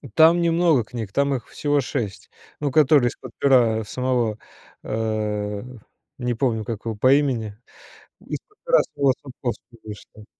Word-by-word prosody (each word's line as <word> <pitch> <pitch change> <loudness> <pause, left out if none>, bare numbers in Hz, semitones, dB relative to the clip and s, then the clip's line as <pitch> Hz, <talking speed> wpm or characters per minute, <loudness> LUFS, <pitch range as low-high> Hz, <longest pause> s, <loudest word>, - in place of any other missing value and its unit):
Там 165 +2 +6
немного 165 -6 +3
книг, 110 -3 -7
там 140 0 +2
их 120 - -6
всего 145 -1 0
6, 110 -6 -4 0.3
ну, 145 -2 -1
которые 145 -4 +5
из-под 125 0 -11
пера 120 -5 +3
самого, 120 -1 -1 0.4
э, 105 -2 -2 0.5
не 125 -1 -1
помню, 110 -3 -1
как 115 -2 -6
его 115 -1 -3
по 130 +6 +4
имени. 125 -8 0 0.7
Из-под 415 - -7
пера - - +4
самого 140 -2 +3
Сапковского 125 -3 -7
вышло. 105 0 -11
125 Hz, 140 wpm, -23 LUFS, 110-140 Hz, 0.7 s, Там